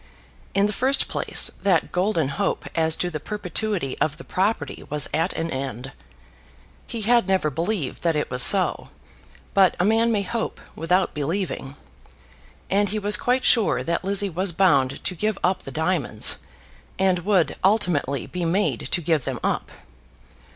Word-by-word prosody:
In 200 Hz, +1 st, +4 dB
the 210 Hz, -, -1 dB
first 265 Hz, +6 st, +1 dB
place, -, -, +2 dB
that 185 Hz, -5 st, +1 dB
golden 180 Hz, -6 st, 0 dB
hope 140 Hz, -, -2 dB
as 160 Hz, -1 st, +2 dB
to 180 Hz, -, -2 dB
the 155 Hz, -, -4 dB
perpetuity 205 Hz, -4 st, -3 dB
of 150 Hz, -1 st, 0 dB
the 170 Hz, -, -10 dB
property 185 Hz, -7 st, -2 dB
was 150 Hz, 0 st, 0 dB
at 165 Hz, +4 st, +1 dB
an 165 Hz, 0 st, -3 dB
end. 130 Hz, -1 st, -5 dB, 1.0 s
He 230 Hz, -, -5 dB
had 235 Hz, -1 st, +3 dB
never 190 Hz, -6 st, +1 dB
believed 165 Hz, -1 st, -3 dB
that 165 Hz, -2 st, +1 dB
it 150 Hz, -, -2 dB
was 125 Hz, 0 st, 0 dB
so; 190 Hz, +6 st, +5 dB, 0.6 s
but 195 Hz, -2 st, +4 dB
a 180 Hz, -, +2 dB
man 225 Hz, +2 st, +3 dB
may 205 Hz, -3 st, +1 dB
hope 230 Hz, +3 st, -4 dB, 0.2 s
without 180 Hz, +4 st, +1 dB
believing. 150 Hz, -2 st, -3 dB, 0.9 s
And 200 Hz, +1 st, +1 dB
he 215 Hz, -, -2 dB
was 210 Hz, 0 st, +2 dB
quite 250 Hz, +4 st, 0 dB
sure 200 Hz, -, +3 dB
that 170 Hz, +6 st, -2 dB
Lizzie 200 Hz, +1 st, 0 dB
was 185 Hz, +1 st, -2 dB
bound 140 Hz, -8 st, +2 dB
to -, -, 0 dB
give 210 Hz, +4 st, -1 dB
up 185 Hz, +1 st, +1 dB
the -, -, -8 dB
diamonds, 160 Hz, -9 st, +1 dB, 0.6 s
and 185 Hz, -1 st, +2 dB
would 180 Hz, -5 st, +1 dB
ultimately 175 Hz, -9 st, +1 dB
be 180 Hz, -1 st, -5 dB
made 185 Hz, +5 st, 0 dB
to 175 Hz, -, -1 dB
give 160 Hz, -3 st, +1 dB
them -, -, -3 dB
up. -, -, -1 dB
180 Hz, 165 wpm, -23 LUFS, 155-205 Hz, 1.0 s, so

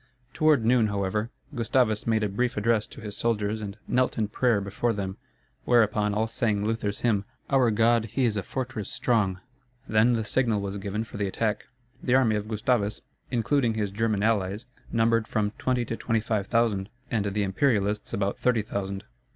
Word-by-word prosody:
Toward 155 Hz, -7 st, +3 dB
noon, 120 Hz, -1 st, +4 dB
however, 100 Hz, +2 st, -1 dB, 0.2 s
Gustavus 115 Hz, -3 st, +1 dB
made 110 Hz, -1 st, +2 dB
a -, -, +2 dB
brief 120 Hz, +4 st, -1 dB
address 110 Hz, 0 st, +2 dB
to -, -, -12 dB
his 105 Hz, -2 st, -6 dB
soldiers 110 Hz, -2 st, 0 dB
and 100 Hz, 0 st, -6 dB
knelt 130 Hz, +1 st, +1 dB
in 110 Hz, -2 st, 0 dB
prayer 120 Hz, -1 st, +2 dB
before 100 Hz, +4 st, -1 dB
them, 95 Hz, -2 st, -4 dB, 0.5 s
whereupon 105 Hz, -3 st, +3 dB
all 110 Hz, +1 st, +2 dB
sang 110 Hz, -2 st, -1 dB
Luther's 105 Hz, -2 st, -2 dB
hymn, 105 Hz, -5 st, +2 dB, 0.3 s
"Our 130 Hz, -3 st, +4 dB
God 115 Hz, +1 st, +3 dB
he 125 Hz, +4 st, 0 dB
is 110 Hz, -3 st, +1 dB
a 100 Hz, -, 0 dB
fortress 120 Hz, -1 st, -4 dB
strong." 110 Hz, -7 st, 0 dB, 0.5 s
Then 110 Hz, +3 st, +4 dB
the 110 Hz, -2 st, 0 dB
signal 115 Hz, -2 st, +1 dB
was 100 Hz, 0 st, -4 dB
given 100 Hz, +2 st, -3 dB
for 115 Hz, -, -9 dB
the 100 Hz, -1 st, 0 dB
attack. 105 Hz, +2 st, -2 dB, 0.3 s
The 125 Hz, -, +2 dB
army 120 Hz, -5 st, +4 dB
of 105 Hz, 0 st, -3 dB
Gustavus, 110 Hz, -1 st, 0 dB, 0.3 s
including 120 Hz, 0 st, +1 dB
his 105 Hz, -3 st, -1 dB
German 105 Hz, 0 st, 0 dB
allies, 105 Hz, 0 st, 0 dB, 0.3 s
numbered 115 Hz, -1 st, +2 dB
from 105 Hz, -1 st, 0 dB
twenty 125 Hz, -2 st, 0 dB
to 115 Hz, -, -3 dB
twenty 115 Hz, 0 st, 0 dB
five 105 Hz, -2 st, -1 dB
thousand, 115 Hz, -4 st, +1 dB, 0.2 s
and 105 Hz, -4 st, 0 dB
the 100 Hz, +1 st, 0 dB
Imperialists 105 Hz, 0 st, +1 dB
about 100 Hz, 0 st, -1 dB
thirty 120 Hz, -4 st, +2 dB
thousand. 100 Hz, -2 st, -4 dB
110 Hz, 180 wpm, -27 LUFS, 100-115 Hz, 0.5 s, noon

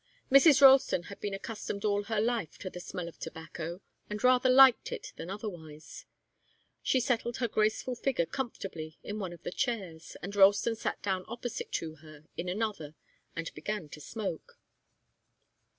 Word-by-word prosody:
Mrs. 275 Hz, 0 st, +7 dB
Ralston 265 Hz, -9 st, +7 dB
had -, -, -14 dB
been 205 Hz, -1 st, -3 dB
accustomed 205 Hz, 0 st, -5 dB
all 205 Hz, -1 st, +1 dB
her 220 Hz, -1 st, -1 dB
life 225 Hz, -5 st, -1 dB
to 185 Hz, -, -6 dB
the 180 Hz, -, -7 dB
smell 180 Hz, -1 st, -5 dB
of 170 Hz, -, -11 dB
tobacco, 165 Hz, +2 st, -7 dB, 0.3 s
and 210 Hz, +2 st, -5 dB
rather 255 Hz, 0 st, +5 dB
liked 260 Hz, -1 st, +7 dB
it -, -, -6 dB
than 165 Hz, -, -7 dB
otherwise. 185 Hz, -, -8 dB, 0.8 s
She 260 Hz, -, +2 dB
settled 240 Hz, -1 st, 0 dB
her 245 Hz, -, 0 dB
graceful 215 Hz, +3 st, 0 dB
figure 245 Hz, -7 st, 0 dB
comfortably 180 Hz, -, -5 dB
in 210 Hz, +1 st, -5 dB
one 190 Hz, -4 st, -4 dB
of 175 Hz, -, -12 dB
the -, -, -4 dB
chairs, 185 Hz, -8 st, -3 dB
and 200 Hz, +3 st, -5 dB
Ralston 205 Hz, +3 st, +5 dB
sat -, -, -4 dB
down 190 Hz, -2 st, -1 dB
opposite 240 Hz, +1 st, -5 dB
to 160 Hz, -1 st, -3 dB
her 155 Hz, 0 st, -15 dB
in 180 Hz, -, -3 dB
another 190 Hz, -7 st, -3 dB, 0.4 s
and 165 Hz, 0 st, -4 dB
began 175 Hz, 0 st, -4 dB
to 150 Hz, -, -10 dB
smoke. 195 Hz, -1 st, -5 dB
205 Hz, 165 wpm, -31 LUFS, 170-235 Hz, 0.8 s, Mrs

